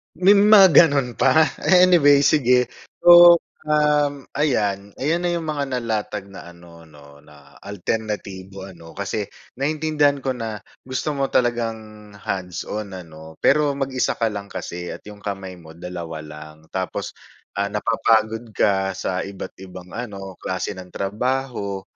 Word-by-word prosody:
May 190 +4 +5
mga 205 -1 +7
gano'n 140 -7 +4
pa? 140 +5 +4 0.2
Anyway 175 -6 +6
sige 125 -4 +3 0.3
so, 175 0 +9 0.3
uhm, 150 -2 +1
ayan 100 -9 0
ayan 165 +5 0
na - - +1
'yung 170 - -2
mga 145 -2 -2
nalatag 105 -4 -3
na 95 - -11
ano 85 -1 -16
'no, 70 -2 -17
na 70 -1 -19
alternatibo 100 -1 -5
ano 85 -3 -14
kasi 100 +1 -3 0.3
naintindihan 145 0 +1
ko 135 - -3
na 110 -3 -5 0.2
gusto 130 +3 -3
mo 135 0 -2
talagang 110 -3 -2
hands 95 -3 -5
on 105 -2 -6
ano, 80 -3 -11
pero 145 0 +3
mag-isa 135 -2 -1
ka 115 -1 -1
lang 100 -1 -8
kasi 90 0 -6
at - - -10
'yung 105 0 -12
kamay 95 -3 -6
mo 80 -2 -14
2 85 -2 -7
lang. 75 +1 -12
Tapos, 95 -1 -5 0.4
ah, 100 - +1
napapagod 110 +1 0
ka 95 -2 +1
sa 95 -1 -3
iba't-ibang 95 -2 -10
ano, 100 -6 -7
klase 95 +1 -4
ng 90 -1 -11
trabaho, 105 -1 -3
105 Hz, 140 wpm, -21 LUFS, 95-140 Hz, 0.4 s, so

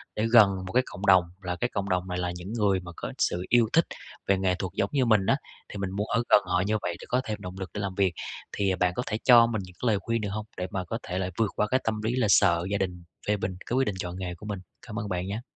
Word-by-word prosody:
để 105 - 0
gần 110 -4 +9 0.2
một - - -7
cái 125 +1 +4
cộng 95 - -7
đồng, 95 -2 +7 0.2
là 90 -2 -3
cái 120 +7 -1
cộng 100 0 -2
đồng 90 0 0
này 90 0 -3
là 90 0 -1
những 90 +5 -7
người 100 -4 +2
mà 90 -1 -9
có - - -5
sự 90 +1 0
yêu 120 -2 +4
thích 165 - +5 0.4
về 100 - +4
nghệ 95 -1 +1
thuật 90 -1 -4
giống 100 - 0
như 135 -3 +3
mình 110 -5 +4
á, 135 - +3 0.3
thì - - -7
mình 95 -1 -3
muốn 105 +2 -2
ở 115 +3 +1
gần 105 - +7
họ 90 0 +1
như 110 - +2
vậy 85 -1 -2
để - - -9
có 125 +1 +2
thêm 105 -1 -3
động 90 -1 -7
lực 95 - -5
để 105 - -3
làm 95 -2 -3
việc. 95 -3 +2 0.4
Thì 95 -2 0
bạn 90 0 +1
có 125 - -1
thể 110 - -2
cho 120 -2 +8
mình 110 -3 -2
những 90 - -14
cái 125 - 0
lời 105 - +3
khuyên 115 +1 -1
được 105 - -2
hông? 105 +1 -4
Để 90 0 -2
mà 95 -2 -2
có 115 +6 -3
thể 90 0 -2
là 95 -1 -1
vượt 110 -3 +1
qua 105 - +1
cái 130 +4 +2
tâm 110 -1 -1
lý 115 +3 0
là 125 -4 +2
sợ 85 -4 +4
gia 100 - +1
đình 90 -3 -3 0.2
phê 105 0 +2
bình 95 -1 -3
cái 120 - -2
quyết 130 -3 +2
định 100 - -1
chọn 90 -1 -4
nghề 90 -2 -4
của 85 - -12
mình? 105 -3 -4 0.3
Cảm 115 0 -4
ơn 105 -2 -4
bạn 90 0 -2
nhá. 105 +4 -3
100 Hz, 310 wpm, -27 LUFS, 90-110 Hz, 0.4 s, gần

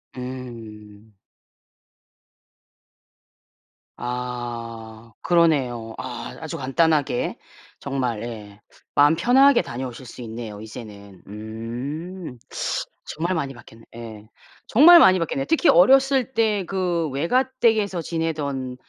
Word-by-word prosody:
음. 115 -5 -9 2.8
아 115 -2 -6
그러네요. 135 -10 +1
아 125 -2 -7
아주 160 -2 -6
간단하게 145 -1 +1 0.4
정말 130 -5 -2
예 105 -3 -8 0.4
마음 145 +2 +5
편하게 255 +9 +5
다녀오실 125 +1 -7
수 125 - -11
있네요 110 -2 -7
이제는. 105 -4 -11
음. 125 - -6 0.7
정말 170 +4 -2
많이 140 -4 -3
바뀌었네 115 -2 -16
예. 110 -2 -10 0.4
정말 335 +8 +8
많이 185 -10 +6
바뀌었네요. 250 +11 -2
특히 325 +1 +3
어렸을 265 +7 +5
때 215 -4 +1
그 175 -3 -1
외가댁에서 215 - +1
지내던 150 -6 -3
130 Hz, 210 characters per minute, -23 LUFS, 115-175 Hz, 2.8 s, 정말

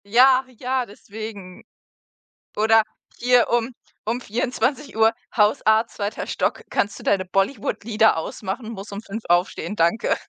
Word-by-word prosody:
Ja, 255 +5 +5
ja, 255 +1 -1
deswegen. 205 -3 -9 0.9
Oder 220 +1 +4 0.3
hier 245 0 +3
um 240 +1 0 0.3
um 235 +3 -1
24:00: 245 0 0 0.2
„Hausarzt, 220 +1 +3
zweiter 205 0 -3
Stock, - - -1
kannst 205 +1 -1
du - - -11
deine 190 -2 +1
Bollywood-Lieder 215 +1 +1
ausmachen, 200 +7 -5
muss 200 -2 -8
um 200 +1 -5
5:00 220 +1 -7
aufstehen, 175 +4 +1
danke.“ 170 +6 +2
220 Hz, 120 wpm, -23 LUFS, 200-240 Hz, 0.9 s, Ja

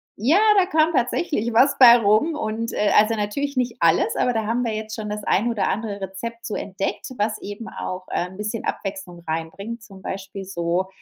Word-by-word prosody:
ja, 265 - +3 0.2
da 380 - +5
kam 320 -2 +2
tatsächlich 240 -2 0
was 275 +4 +4
bei 245 -3 +10
rum 220 +8 +3
und 230 -4 -3
äh, 210 - +1
also 215 +2 +4
natürlich 280 +8 -2
nicht 250 -2 0
alles, 170 +6 +3
aber 245 - +1
da 220 -1 -1
haben 235 +2 0
wir 225 - -1
jetzt 215 0 -5
schon 215 -2 -5
das 210 0 -4
ein 210 +4 +1
oder 230 -3 0
andere 205 -1 -3
Rezept 230 +5 -6
so 215 - -3
entdeckt, 195 +5 -4
was 215 +1 -1
eben 205 +3 -7
auch, 185 0 -6
ähm, 180 +1 -2
'n 185 - -13
bisschen 210 +2 -4
Abwechslung 190 -3 -5
reinbringt, 195 +8 -5
zum 195 -3 -14
Beispiel 195 +1 -6
so 175 0 -1
215 Hz, 200 wpm, -23 LUFS, 195-235 Hz, 0.2 s, bei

